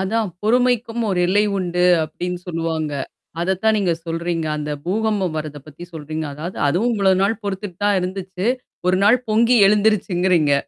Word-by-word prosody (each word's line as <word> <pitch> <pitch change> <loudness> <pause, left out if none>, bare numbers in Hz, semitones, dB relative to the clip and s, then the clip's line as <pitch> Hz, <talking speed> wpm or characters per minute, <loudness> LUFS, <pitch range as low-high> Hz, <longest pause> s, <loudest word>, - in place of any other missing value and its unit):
அதான் 215 +2 0
பொறுமைக்கும் 240 0 +1
ஒரு 180 -2 0
எல்லை 205 +3 +3
உண்டு 180 -1 0 0.2
அப்படின்னு 180 +3 -5
சொல்லுவாங்க. 165 -3 -2 0.5
அதத்தான் 190 +5 +1
நீங்க 180 -4 +1
சொல்றீங்க. 165 0 -2
அந்த 150 0 -4 0.2
பூகம்பம் 200 -3 0
வர்றத 155 -1 -5
பத்தி 155 +3 -10
சொல்றீங்க. 155 0 -5
அதாவது, 165 +5 -6
அதுவும் 215 +11 +1
இவ்ளோ 195 -2 +3
நாள் 220 +3 0
பொறுத்துட்டு 195 -2 -5
தான் 205 -1 +3
இருந்துச்சு. 185 +1 -4 0.4
ஒரு 180 0 +3
நாள் 225 +5 +5
பொங்கி 230 +3 +4
எழுந்துருச்சுங்கிறீங்க. 190 -6 +2
185 Hz, 145 wpm, -20 LUFS, 165-210 Hz, 0.5 s, நாள்